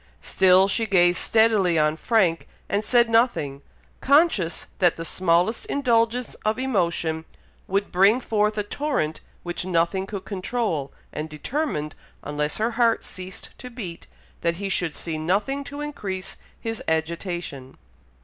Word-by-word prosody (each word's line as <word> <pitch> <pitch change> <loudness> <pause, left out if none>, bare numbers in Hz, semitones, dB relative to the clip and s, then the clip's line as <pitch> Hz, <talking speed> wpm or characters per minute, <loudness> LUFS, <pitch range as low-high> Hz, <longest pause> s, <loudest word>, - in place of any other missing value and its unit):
Still 190 0 +5
she 225 +3 0
gazed 175 -3 +4
steadily 215 -6 +3
on 150 0 +3
Frank, 170 -6 +1 0.2
and 205 +1 0
said 235 +2 +4
nothing, 170 - +1 0.4
conscious 280 - +3
that 175 -3 +3
the 165 - -5
smallest 180 +5 +1
indulgence 240 -3 +1
of 215 +1 +1
emotion 170 -10 0 0.4
would 200 +1 -1
bring 195 +6 +5
forth 210 -3 0
a 210 - +1
torrent 205 - -2 0.2
which 175 0 -4
nothing 185 +2 0
could 200 -2 -6
control, 185 - -2 0.2
and 155 +1 -4
determined, 155 - -3 0.3
unless 150 +1 -2
her 225 +2 0
heart 230 -1 +2
ceased 185 0 -7
to 250 - -8
beat, 200 -9 -8 0.3
that 170 0 +1
he 195 +2 -4
should 175 -4 -1
see 160 -2 -3
nothing 205 - 0
to 285 +1 -7
increase 195 -10 -5 0.2
his 225 -1 -4
agitation. 160 -4 -3
190 Hz, 140 wpm, -24 LUFS, 170-230 Hz, 0.4 s, Still